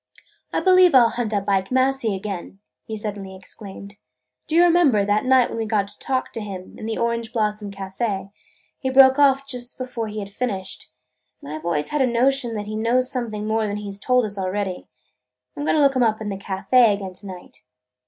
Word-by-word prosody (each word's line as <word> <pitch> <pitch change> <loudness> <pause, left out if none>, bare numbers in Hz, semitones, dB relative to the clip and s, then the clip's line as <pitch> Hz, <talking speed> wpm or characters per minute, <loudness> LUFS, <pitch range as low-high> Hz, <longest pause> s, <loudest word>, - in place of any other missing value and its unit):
"I - - 0
believe 370 -4 +6
I 255 - +8
'll 230 - +3
hunt 235 -2 -3
up 200 -1 -1
Ike 195 -1 +1
Massey 260 -4 +1
again!" 195 -1 -6 0.3
he 220 -2 -5
suddenly 200 -2 -6
exclaimed. 200 +1 -11 0.5
"Do 315 - -2
you 345 - +7
remember, 330 -12 +4
that 205 +3 +1
night 255 -1 +4
when - - -4
we 225 - -2
got 215 -2 +2
him 200 - -8
to - - -13
talk, 260 -1 -2
in 205 -1 -7
the 225 - -2
Orange 235 -1 -1
Blossom 210 -3 -1
Café, 195 0 -4 0.5
he 260 - -2
broke 265 +1 +6
off 275 -1 +4 0.3
before 250 -3 -4
he 210 0 -7
had 200 -1 -5
finished, 195 - -4 0.5
and 145 - -8
I 155 - -4
've 160 - -14
always 150 -3 -1
had 300 - 0
a 260 - +4
notion 245 0 +1
that 210 -1 -4
he 215 +1 -5
knows 240 +3 +1
something 220 -5 -3
more 220 0 0
than 205 0 -3
he 205 -1 -6
's 195 - -8
told 250 +2 +2
us 205 -1 -3
already. 190 0 -3 0.7
I - - -9
'm 290 - -3
going - - +3
to - - +4
look 275 -1 +4
him 255 - +2
up 220 -2 +2
in 215 -1 -4
the 200 - -3
café 200 +4 +3
again 195 -2 -7
to 195 +2 -9
night." 185 -2 -10
215 Hz, 220 wpm, -22 LUFS, 200-255 Hz, 0.7 s, I